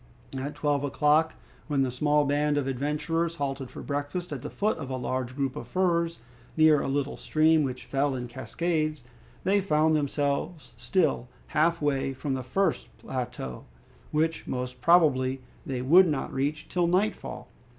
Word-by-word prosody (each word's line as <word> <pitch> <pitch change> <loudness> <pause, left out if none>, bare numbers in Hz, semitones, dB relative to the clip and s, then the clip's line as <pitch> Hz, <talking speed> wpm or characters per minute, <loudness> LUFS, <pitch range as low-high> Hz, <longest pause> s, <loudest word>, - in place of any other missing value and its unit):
At 140 +3 -4
twelve 145 -1 0
o'clock, 150 +3 +2 0.3
when 140 -3 +2
the 130 - -1
small 150 +3 +2
band 145 +1 +1
of 145 - 0
adventurers 150 +5 -1
halted 135 -3 -3
for - - -9
breakfast 145 +5 -3
at 135 - -5
the 150 - -5
foot 210 -4 -1
of 140 -4 -6
a 130 - -2
large 130 0 -3
group 135 -2 -1
of 120 - -7
firs, 170 +1 +1 0.4
near 155 -2 +6
a - - -2
little 140 0 -1
stream 155 0 +3
which 130 -3 -3
fell 140 0 0
in 125 -1 -4
cascades, 155 +4 -2 0.4
they 200 +1 +3
found 155 -4 +3
themselves 145 +2 -1
still 180 -9 0 0.2
half 160 +1 +2
way 135 -2 0
from 135 +1 -3
the 130 - -2
first 190 +11 0
plateau, 120 - -5 0.4
which 160 +2 0
most 125 0 -4
probably 135 -5 +4 0.3
they 125 -2 -2
would 175 +8 +7
not 145 -4 -2
reach 145 +3 -2
till 175 -1 +1
nightfall. 185 +5 -1
145 Hz, 160 wpm, -27 LUFS, 135-160 Hz, 0.4 s, would